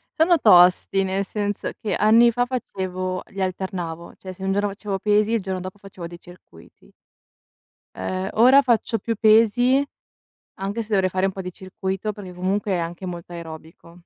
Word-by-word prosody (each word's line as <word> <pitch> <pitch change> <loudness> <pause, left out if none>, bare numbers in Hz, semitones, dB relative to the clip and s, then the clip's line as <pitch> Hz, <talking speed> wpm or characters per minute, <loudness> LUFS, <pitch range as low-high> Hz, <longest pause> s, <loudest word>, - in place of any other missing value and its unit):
Sono 335 +2 +4
tosti, 185 0 +5
nel 190 +1 -1
senso 205 0 -3
che 215 - -2
anni 230 +3 +5
fa 245 +1 0
facevo 185 -7 -4
li 195 - -7
alternavo, 180 -3 -4
cioè 185 -1 -9
se 190 - -11
un 195 - 0
giorno 205 +1 0
facevo 200 -1 -5
pesi, 210 +2 +2
il 230 - +1
giorno 190 -1 -4
dopo 185 +2 -8
facevo 190 -4 -9
dei 175 0 -11
circuiti. 175 - -18 1.0
Ehm, 185 - -3
ora 255 +5 +6
faccio 230 -2 +1
più 230 -1 -3
pesi 230 +5 +4 0.8
anche 200 +4 -3
se 215 - -8
dovrei 190 -2 +2
fare 185 +1 0
un - - -2
po' 190 - -6
di 180 -1 -6
circuito, 190 +2 -4
perché 190 -3 -10
comunque 195 +3 -2
è 180 - +1
anche 170 +2 -5
molto 175 -1 -7
aerobico. 165 0 -11
195 Hz, 175 wpm, -22 LUFS, 185-215 Hz, 1.0 s, ora